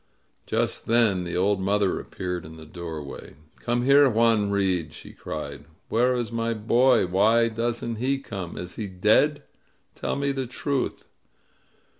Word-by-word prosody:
Just -, -, -1 dB
then 110 Hz, -6 st, +3 dB
the 85 Hz, 0 st, -3 dB
old 100 Hz, +2 st, +2 dB
mother 100 Hz, 0 st, +1 dB
appeared 90 Hz, -1 st, -5 dB
in 80 Hz, +1 st, -11 dB
the 80 Hz, -, -11 dB
doorway. 80 Hz, -5 st, -8 dB, 0.2 s
"Come 120 Hz, 0 st, -1 dB
here, 140 Hz, +1 st, +6 dB
Juan 115 Hz, -3 st, +3 dB
Reed," 95 Hz, -6 st, 0 dB
she -, -, -12 dB
cried. -, -, -7 dB, 0.2 s
"Where 125 Hz, +3 st, +2 dB
is 120 Hz, -2 st, -2 dB
my 115 Hz, 0 st, -1 dB
boy? 120 Hz, +2 st, +3 dB
Why 110 Hz, +6 st, +3 dB
doesn't 115 Hz, 0 st, -2 dB
he 130 Hz, +4 st, 0 dB
come? 95 Hz, -10 st, -7 dB
Is 90 Hz, 0 st, -7 dB
he 110 Hz, -, -3 dB
dead? 110 Hz, +10 st, +2 dB, 0.5 s
Tell -, -, -3 dB
me 140 Hz, 0 st, 0 dB
the 135 Hz, -2 st, -3 dB
truth!" 135 Hz, +2 st, -3 dB
110 Hz, 150 wpm, -25 LUFS, 95-120 Hz, 0.5 s, here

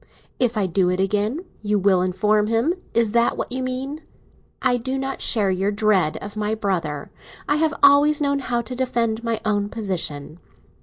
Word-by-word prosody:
"If 245 Hz, -3 st, +1 dB
I 205 Hz, -, +2 dB
do 185 Hz, 0 st, +1 dB
it 180 Hz, +1 st, -1 dB
again, 210 Hz, -, 0 dB, 0.2 s
you 210 Hz, 0 st, +1 dB
will 190 Hz, -2 st, +3 dB
inform 210 Hz, +3 st, +1 dB
him: 230 Hz, +9 st, +1 dB, 0.2 s
is 230 Hz, -2 st, +2 dB
that 235 Hz, +1 st, +2 dB
what -, -, -4 dB
you 260 Hz, +1 st, -2 dB
mean? 260 Hz, +4 st, -4 dB, 0.6 s
I 245 Hz, -1 st, +2 dB
do 260 Hz, +3 st, -3 dB
not 270 Hz, 0 st, -4 dB
share 205 Hz, -4 st, +2 dB
your 190 Hz, +2 st, 0 dB
dread 205 Hz, -6 st, +2 dB
of 205 Hz, +1 st, -8 dB
my 215 Hz, 0 st, -1 dB
brother; 170 Hz, -9 st, -3 dB, 0.4 s
I 290 Hz, +2 st, +2 dB
have 315 Hz, 0 st, +1 dB
always 285 Hz, +1 st, +6 dB
known 280 Hz, -1 st, +1 dB
how 245 Hz, -3 st, -1 dB
to 250 Hz, +2 st, -7 dB
defend 235 Hz, -3 st, -1 dB
my 230 Hz, -1 st, -1 dB
own 205 Hz, -1 st, 0 dB
position. 175 Hz, -8 st, -3 dB
220 Hz, 185 wpm, -22 LUFS, 195-255 Hz, 0.6 s, always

